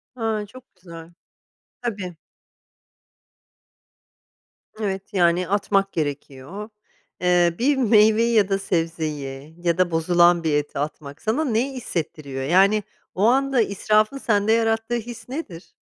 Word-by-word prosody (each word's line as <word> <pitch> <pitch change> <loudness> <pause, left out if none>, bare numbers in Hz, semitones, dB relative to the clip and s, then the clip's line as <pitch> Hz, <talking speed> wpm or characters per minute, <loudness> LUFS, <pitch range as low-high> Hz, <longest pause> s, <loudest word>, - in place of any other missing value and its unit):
A. 220 -3 -2
Çok 250 +1 -16
güzel. 170 -2 -12 0.7
Tabii 200 -7 -4 2.6
Evet, 195 -2 -4
yani 175 -1 +2
atmak 195 0 +1
gerekiyor. 145 +6 -5 0.5
Eee, 175 -1 +3
bir 275 +3 +2
meyveyi 225 0 +4
ya 205 -3 +3
da 195 0 +1
sebzeyi 155 -5 -3
ya 170 0 +1
da 180 -2 +2
bozulan 175 +1 +3
bir 155 -2 0
eti 145 -1 -2
atmak 145 0 -6
sana 255 +9 0
neyi 255 +3 0
hissettiriyor? 155 - -5
Yani, 195 +7 +3 0.3
o 195 - 0
anda 270 0 +3
israfın 215 +4 +1
sende 215 -4 +1
yarattığı 225 +1 +1
his 235 0 -7
nedir? 220 - -7
195 Hz, 115 wpm, -23 LUFS, 165-225 Hz, 2.6 s, meyveyi